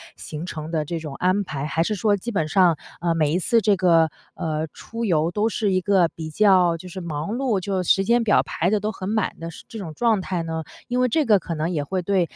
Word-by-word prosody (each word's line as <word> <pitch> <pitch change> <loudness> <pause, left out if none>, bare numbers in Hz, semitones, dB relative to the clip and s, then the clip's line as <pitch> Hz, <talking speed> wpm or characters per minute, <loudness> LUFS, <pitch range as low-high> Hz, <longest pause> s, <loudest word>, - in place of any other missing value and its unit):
行 155 +2 -7
程 160 -3 -6
的 155 -2 -1
这 165 +2 -3
种 155 -3 -7
安 185 +5 +1
排， 145 -6 -4
还 160 +2 0
是 215 - -1
说 205 +1 +2
基 220 +5 -5
本 165 -8 0
上， 175 -1 +4 0.2
呃， 170 -1 +1
每 155 -2 +1
一 180 - +2
次 230 +5 +3
这 205 0 +3
个， 170 -4 +4 0.3
呃， 155 -1 -2
出 230 +1 -7
游 165 -6 +2
都 210 +4 +1
是 210 -2 0
一 185 - +2
个 190 -2 +3
比 160 -1 -6
较 180 -2 +4
就 180 - -11
是 185 +1 -7
忙 165 +4 -4
碌， 245 -6 0
就 190 0 -2
时 195 +2 +3
间 235 +2 +3
表 210 - +4
排 175 - -1
得 210 +1 +2
都 210 +1 -2
很 190 -2 -5
满 215 -2 0
的， 165 0 -6
是 - - -13
这 225 - -9
种 175 -7 -6
状 225 +2 +2
态 185 -2 -2
呢？ 160 0 -4 0.2
因 245 +1 -1
为 250 - +4
这 305 +5 +2
个 215 -4 +5
可 170 - -5
能 155 +2 -1
也 155 -5 -1
会 185 +6 -2
对 190 +1 +1
185 Hz, 275 characters per minute, -23 LUFS, 165-205 Hz, 0.3 s, 个